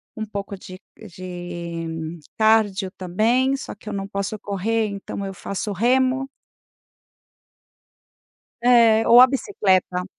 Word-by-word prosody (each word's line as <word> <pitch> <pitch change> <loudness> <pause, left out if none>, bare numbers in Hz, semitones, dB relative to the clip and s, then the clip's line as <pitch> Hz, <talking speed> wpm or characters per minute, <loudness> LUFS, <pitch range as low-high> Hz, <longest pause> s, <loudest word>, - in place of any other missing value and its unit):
um 220 - -4
pouco 200 -1 -5
de 185 0 -11 0.3
de 170 -2 -6 0.2
cárdio 215 -4 +2
também, 230 +10 +1
só - - -7
que 210 - -11
eu - - -5
não 195 -1 -4
posso 200 +2 -4
correr, 215 +3 -1
então, 200 0 -6
eu 195 - -5
faço 200 +2 -5
remo. 255 +6 +1 2.3
É, 230 -2 +5
ou 235 +1 +9
a - - +9
bicicleta. 190 - 0
200 Hz, 120 wpm, -22 LUFS, 185-225 Hz, 2.3 s, ou